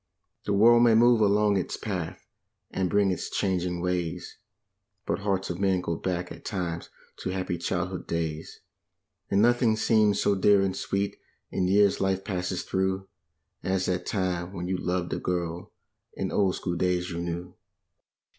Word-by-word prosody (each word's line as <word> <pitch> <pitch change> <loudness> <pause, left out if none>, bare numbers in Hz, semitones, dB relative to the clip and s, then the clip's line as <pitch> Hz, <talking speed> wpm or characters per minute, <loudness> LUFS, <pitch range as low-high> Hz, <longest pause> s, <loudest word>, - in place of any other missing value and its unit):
The 100 - 0
world 120 +4 +6
may 120 -2 +6
move 120 0 +5
along 105 0 +3
its 90 - -2
path 90 -6 -5 0.5
and 95 -1 -1
bring 100 0 +3
its 90 - -3
changing 90 -2 -1
ways. 90 -2 -3 0.7
But - - -1
hearts 100 -2 -1
of 90 - -5
men 95 -2 +2
go 85 -2 -2
back 90 0 -3
at - - -10
times 85 -4 -3 0.3
to - - -4
happy 90 -2 -2
childhood 90 +1 -3
days, 80 -2 -3 0.7
And 100 +1 +3
nothing 120 -1 +4
seems 110 -2 +3
so 100 - +3
dear 100 +1 +4
and 95 -1 -1
sweet 100 0 -2 0.3
in 90 - 0
years 100 +1 +4
life 95 0 0
passes 90 -2 -2
through 95 0 -1 0.5
As 95 0 0
that 90 -1 -2
time 90 -2 -1
when 90 -2 -4
you 95 0 -1
loved 90 -1 -1
a - - -2
girl 85 -1 -3 0.4
in - - -3
old 95 -2 +2
school 90 -2 -3
days 90 +1 0
you 85 - -4
knew. 85 +1 -4
95 Hz, 165 wpm, -27 LUFS, 90-100 Hz, 0.7 s, world